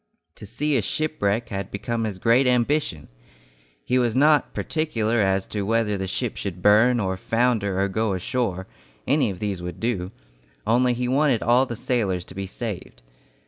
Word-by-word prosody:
To - - -10
see 150 -1 0
a - - +1
shipwreck 115 -3 -1
had 100 -1 -4
become 115 +3 -3
his 105 -4 -4
great 115 +7 +3
ambition. 125 - +1 0.8
He 125 - +2
was 120 -3 +1
not 150 +2 +4
particular 120 -8 -1
as 95 -1 +1
to 105 - -3
whether 110 0 +1
the 95 -1 -3
ship 115 +5 -3
should 90 -3 -5
burn 115 +4 +5
or 95 -3 -1
founder 110 -3 0
or 100 - +2
go 110 +1 -1
ashore, 95 0 -2 0.4
any 140 -4 +2
of 95 - -5
these 100 -2 -3
would 90 0 -6
do, 100 -5 -2 0.5
only 120 +3 +3
he 125 +1 -2
wanted 135 -2 +2
all 125 +3 +4
the 120 - -4
sailors 100 -7 -1
to - - -12
be 95 0 -5
saved. 100 - -6
110 Hz, 175 wpm, -24 LUFS, 95-125 Hz, 0.8 s, burn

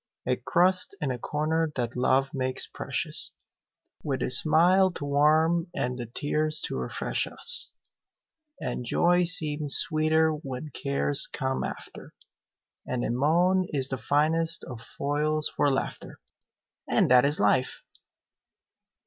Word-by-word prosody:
A 125 - +1
crust 180 +10 +1
and 150 -6 -2
a 125 - -4
corner 155 +4 -1
that 120 -1 -3
love 135 +3 +1
makes 130 -2 -1
precious, - - -3 0.7
With 135 -3 -2
a - - -1
smile 175 +7 +4
to 145 - -6
warm 155 +4 +2
and 125 0 -2
the 120 - -5
tears 155 +5 -2
to - - -4
refresh - - -3
us; 480 - +1 0.9
And - - -4
joy 175 +8 +2
seems 150 -4 +1
sweeter 160 0 +2
when 145 -1 -6
cares 140 +2 -1
come 130 -1 -2
after, - - -8 0.7
And 125 -1 -3
a - - -1
moan 175 +8 +2
is 135 -2 -1
the 130 - -2
finest 160 +6 +1
of 120 -3 -8
foils 150 +4 -1
for 145 - +2
laughter; 135 - -4 0.7
And - - +2
that 125 -1 +7
is 145 +2 +3
life! 125 +5 +1
150 Hz, 130 wpm, -27 LUFS, 130-160 Hz, 0.9 s, that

